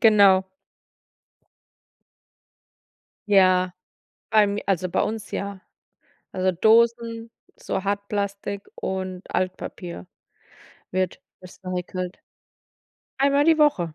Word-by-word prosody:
Genau. 200 -4 +6 2.8
Ja. 185 -2 +4 0.6
Allem 205 -1 +3
also, 185 -2 0
bei - - +1
uns, 220 -1 -4
ja. 200 -1 -4 0.7
Also, 185 0 0
Dosen, 230 +3 +2 0.3
so - - -3
Hartplastik 200 0 -2
und 190 - -4
Altpapier 180 - -4 0.9
wird 185 -1 -1 0.2
recycelt. 185 0 -5 1.0
Einmal 280 +1 +3
die 325 0 +4
Woche. 195 - +2
200 Hz, 75 wpm, -24 LUFS, 185-220 Hz, 2.8 s, Genau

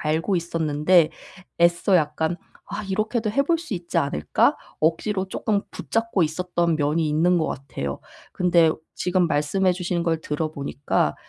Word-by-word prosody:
알고 160 +5 0
있었는데 165 0 +2 0.8
애써 185 - +7
약간 160 +2 0 0.3
'아 205 +2 -5
이렇게도 215 +3 -1
해 275 +6 +2
볼 330 +3 +1
수 330 - -5
있지 170 -1 -2
않을까?' 80 - +1 0.2
억지로 190 +5 0
쪼끔 200 +1 -1
붙잡고 225 -5 -1
있었던 170 +1 0
면이 155 +1 +1
있는 175 +4 +3
것 160 - 0
같아요. 100 - -5 0.3
근데 170 -3 +4 0.2
지금 180 -1 +1
말씀해 180 +6 +1
주신 175 -1 -2
걸 165 -1 0
들어 155 +1 -2
보니까 140 -1 -1
170 Hz, 305 characters per minute, -23 LUFS, 155-190 Hz, 0.8 s, 애써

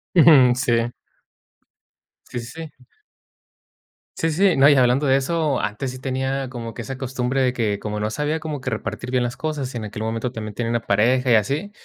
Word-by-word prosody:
Ujú. 145 -7 +7
Sí. 120 -1 0 1.4
Sí, 120 - -4
sí, 115 - -9 0.3
sí. 125 - -22 1.3
Sí, 165 - 0
sí. 180 +3 +3
No, 135 +2 +7
y 145 - +6
hablando 130 +2 +3
de 135 - +4
eso, 150 0 0
antes 105 +6 -3
sí 130 - -7
tenía 130 +1 -2
como 115 -3 -7
que 115 - -5
esa 135 +2 -7
costumbre 130 0 -1
de 130 -1 +2
que, 110 -5 -1
como 105 0 -4
no 105 +1 -2
sabía 150 +5 -1
cómo 155 -3 -5
que 130 - -3
repartir 120 +2 -5
bien 125 -1 +1
las 120 0 -3
cosas, 145 -4 -3
y - - -4
en 110 - -5
aquel 105 +1 -6
momento 115 +2 -2
también 110 -3 -6
tenía 115 +2 -3
una 120 0 0
pareja 125 +4 +2
y - - +7
así. 140 - +1
130 Hz, 205 wpm, -22 LUFS, 115-140 Hz, 1.4 s, Ujú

